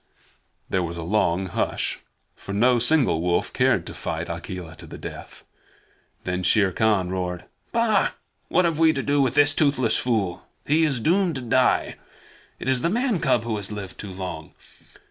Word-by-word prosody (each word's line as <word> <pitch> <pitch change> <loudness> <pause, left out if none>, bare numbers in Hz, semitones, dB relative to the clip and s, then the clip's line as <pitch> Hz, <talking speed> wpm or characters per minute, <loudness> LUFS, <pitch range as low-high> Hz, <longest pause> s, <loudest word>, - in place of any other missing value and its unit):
There 95 - 0
was 85 0 -4
a 85 - -5
long 95 0 +1
hush, 90 - -2 0.4
for 100 - -8
no 120 +4 +3
single 125 - +2
wolf 85 0 0
cared - - +2
to - - -6
fight 80 +1 -4
Akela 85 0 -7
to - - -10
the - - -9
death. - - -9 0.8
Then 90 0 -2
Shere 95 +1 +3
Khan 105 -5 +1
roared: 90 -1 -3 0.3
"Bah! 230 -2 +2 0.4
What 180 - +3
have 165 -2 0
we 160 -1 +5
to 135 - -2
do 145 0 +2
with 130 -1 +1
this 145 0 +5
toothless 140 -6 +2
fool? 100 -8 -1 0.2
He 160 +3 +3
is 135 -5 0
doomed 175 - +2
to 130 - -4
die! 125 +1 +1 0.6
It - - -7
is 130 -2 +2
the 170 - +1
man 235 -1 0
cub 130 -6 +2
who 115 -2 -2
has 100 0 -5
lived 100 -3 -7
too 100 - -7
long. 95 -1 -7
115 Hz, 180 wpm, -24 LUFS, 90-145 Hz, 0.8 s, we